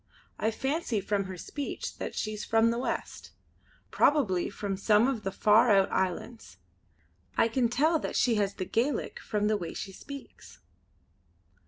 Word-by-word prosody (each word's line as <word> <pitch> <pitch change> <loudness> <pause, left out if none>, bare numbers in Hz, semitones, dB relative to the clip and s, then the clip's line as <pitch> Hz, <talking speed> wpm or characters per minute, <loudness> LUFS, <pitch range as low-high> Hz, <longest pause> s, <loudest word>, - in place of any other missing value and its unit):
I 220 - +1
fancy 265 0 -1
from 200 0 -1
her 190 -1 -7
speech 285 +10 -5
that - - -5
she's 215 -1 -3
from 225 +1 +3
the 235 - -2
west; 255 - -4 0.6
probably 215 - +2
from 200 -1 -4
some 210 +4 +3
of 265 -5 -1
the 195 - -3
far 215 +5 +4
out 195 -2 +4
islands. 190 - -3 0.8
I - - +5
can 235 +1 +1
tell 310 +7 +2
that - - -4
she 245 - +3
has 200 -2 0
the 185 - -3
Gaelic 245 +6 -1
from 210 -1 -2
the 215 0 +2
way 175 -4 -6
she 195 - -5
speaks." 280 +8 -11
220 Hz, 160 wpm, -29 LUFS, 200-245 Hz, 0.8 s, I